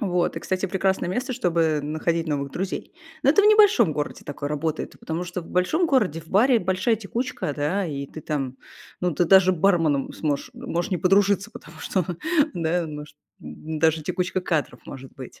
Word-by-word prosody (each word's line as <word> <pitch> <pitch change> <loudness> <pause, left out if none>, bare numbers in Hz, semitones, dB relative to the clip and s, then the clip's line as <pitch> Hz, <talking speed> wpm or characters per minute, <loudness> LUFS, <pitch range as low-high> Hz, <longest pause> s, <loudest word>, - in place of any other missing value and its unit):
Вот, 180 -3 0
и, - - -3
кстати, 185 +1 -2
прекрасное 190 -1 0
место, 250 +8 -2
чтобы 165 - +1
находить 165 +3 -1
новых 140 -2 -2
друзей. 190 +1 -4 0.3
Но - - +5
это - - +5
в - - +5
небольшом 415 - +6
городе 150 0 -4
такое 145 0 -5
работает, 155 +1 -3
и - - -19
потому 165 +2 -4
что 180 +1 -5
в 165 - -12
большом 310 - +1
городе, 210 - +1
в 160 - -18
баре 235 +5 +4
большая 190 +3 +1
текучка. 225 - -3
Да, 165 +7 -1
и 140 -3 -4
ты 155 - -10
там, 135 -4 -3 0.4
ну, 180 -2 0
ты 175 - +2
даже 185 +1 +6
барменом 165 -6 +2
сможешь, 150 - -2
э, - - -13
можешь 175 -9 -3
не 185 - +1
подружиться. 195 +3 +3
Потому 160 -4 -13
что, 185 +1 -1 0.5
да, 170 0 0
может 150 -1 -9 0.2
д 160 0 -7
даже 160 0 +2
текучка 185 +4 -2
кадров 160 -5 -2
может 135 -1 -10
быть. 130 -2 -11
175 Hz, 190 wpm, -24 LUFS, 155-195 Hz, 0.5 s, небольшом